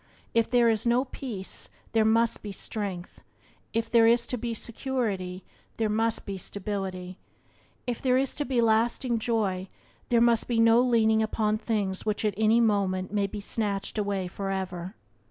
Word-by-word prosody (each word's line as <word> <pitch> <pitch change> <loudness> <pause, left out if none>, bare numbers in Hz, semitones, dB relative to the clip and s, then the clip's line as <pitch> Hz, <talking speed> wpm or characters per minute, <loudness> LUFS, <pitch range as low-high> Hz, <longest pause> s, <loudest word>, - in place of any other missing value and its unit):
If 230 -1 +2
there 240 -1 +4
is 225 0 +1
no 245 +3 +3
peace 235 -7 -5 0.2
there 225 -1 +3
must 230 +1 +2
be 205 - -6
strength; 195 -3 -5 0.5
if 230 0 -1
there 230 -1 +6
is 235 +1 +4
to - - +3
be 235 -1 -3
security 215 -7 -3 0.3
there 220 -1 +1
must 225 +1 +1
be 195 -1 -5
stability; 190 -2 -4 0.7
if 245 -2 -3
there 255 -1 +3
is 270 0 0
to 295 - -2
be 250 -3 +1
lasting 230 +2 +2
joy 200 -5 -1 0.4
there 235 - +4
must 235 -1 +3
be 235 -2 +1
no 230 +1 +6
leaning 220 -3 +3
upon 215 -1 0
things 200 -5 -2
which 215 0 -1
at 210 - +1
any 220 +2 +4
moment 200 -4 +1
may 200 -1 +1
be 205 +1 -6
snatched 205 0 -2
away 200 -3 -1
forever. 190 0 -4
220 Hz, 165 wpm, -27 LUFS, 195-235 Hz, 0.7 s, there